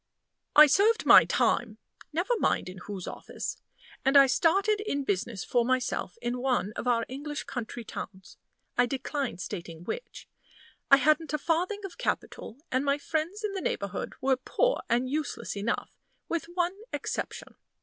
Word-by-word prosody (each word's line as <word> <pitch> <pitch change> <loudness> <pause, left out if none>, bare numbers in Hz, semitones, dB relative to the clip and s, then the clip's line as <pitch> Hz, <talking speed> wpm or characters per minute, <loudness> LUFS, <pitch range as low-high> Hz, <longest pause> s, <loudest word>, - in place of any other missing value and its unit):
I 300 - +11
served 405 +10 +3
my - - +9
time - - +1 0.3
never 350 +10 0
mind - - +1
in 185 +1 -9
whose 190 -1 -6
office - - -6 0.4
and 275 +1 +5
I 275 - +9
started 395 +9 +2
in 285 -9 -1
business 200 -2 -2
for 240 -1 +2
myself 255 - -1
in 245 +1 -1
one 245 -5 0
of - - -4
our 230 -2 +2
English 290 +3 -5
country 240 -2 -5
towns, 190 -3 -8 0.4
I 245 0 +4
decline 270 - -3
stating 170 -3 -6
which. - - -6 0.6
I 275 - +9
hadn't 305 +2 +2
a - - +2
farthing 360 +7 -1
of 380 - -9
capital, 225 - -3
and 260 +2 +1
my 280 0 +2
friends 325 +8 -3
in 425 - -1
the 385 - -3
neighborhood 200 - -3
were 265 0 +3
poor - - +1
and 245 +2 +2
useless 300 -3 -3
enough, 205 +3 -2 0.3
with 335 -1 -2
one 350 0 +1 0.2
exception. - - -4
275 Hz, 160 wpm, -28 LUFS, 235-330 Hz, 0.6 s, I